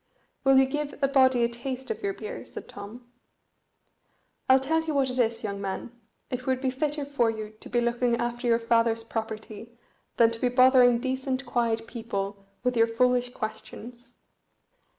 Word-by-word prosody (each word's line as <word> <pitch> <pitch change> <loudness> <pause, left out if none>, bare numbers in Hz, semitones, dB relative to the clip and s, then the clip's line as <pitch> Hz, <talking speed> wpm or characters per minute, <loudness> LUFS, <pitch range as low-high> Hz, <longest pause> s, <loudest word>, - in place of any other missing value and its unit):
"Will 270 0 +5
you 265 - +6
give 295 +2 -3
a - - +5
body 260 -3 +4
a - - +4
taste 255 - -5
of 450 - -5
your 395 -1 -2
beer?" 470 +3 -7
said - - -9
Tom. 210 +5 -10 1.4
"I'll 260 - +8
tell 310 +5 +1
you 320 -2 -3
what 270 -2 +2
it 255 - -4
is, 230 -1 +1
young 200 -2 -4
man, 195 +4 -4 0.4
it 250 0 -4
would 260 -1 +1
be 260 -1 0
fitter 290 +2 -2
for 275 -5 +1
you 215 -1 -5
to - - -10
be 240 - +1
looking 240 0 +1
after 240 +1 -2
your 230 -1 +4
father's 230 -1 +1
property 220 0 -6 0.4
than 230 -1 +5
to 230 - -7
be 250 - +2
bothering 250 -1 +6
decent 260 +1 -2
quiet 230 -2 0
people 200 -4 -5 0.2
with 250 0 +1
your 230 0 +4
foolish 245 +1 +2
questions. 235 +2 -7
245 Hz, 175 wpm, -27 LUFS, 230-260 Hz, 1.4 s, I'll